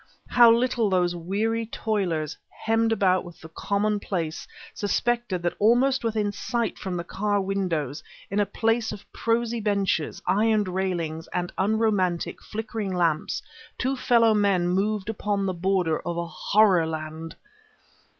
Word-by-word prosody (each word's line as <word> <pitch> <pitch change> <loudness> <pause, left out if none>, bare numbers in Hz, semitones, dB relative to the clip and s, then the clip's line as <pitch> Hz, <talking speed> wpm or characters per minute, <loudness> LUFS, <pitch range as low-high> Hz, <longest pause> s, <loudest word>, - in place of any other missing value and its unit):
How 240 -1 +7
little 235 -2 +2
those 180 -2 +1
weary 215 +6 -1
toilers, 185 -10 -2
hemmed 225 0 0
about 185 -4 +2
with 175 -2 -12
the 160 - -11
commonplace, 200 -4 -2 0.3
suspected 215 -3 -1
that 175 - 0
almost 245 +5 +3
within 215 -2 0
sight 230 +2 -2
from 185 -2 -3
the 170 - -3
car 205 +3 -1
windows, 180 -7 -2 0.3
in 200 - 0
a 205 - +2
place 225 +3 0
of 210 -1 -9
prosy 230 0 0
benches, 200 -6 0
iron 215 +1 +3
railings, 180 -4 -2
and 175 0 -2
unromantic, 200 -4 0
flickering 220 -2 -4
lamps, 165 -3 0 0.3
two 265 +2 0
fellow 235 -3 +4
men 200 -4 +2
moved 200 +2 0
upon 205 -2 -1
the 190 - -1
border 180 -2 +1
of 170 0 -4
a 170 - -1
horror 185 -1 +3
land! 160 0 -6
200 Hz, 140 wpm, -25 LUFS, 175-220 Hz, 0.3 s, How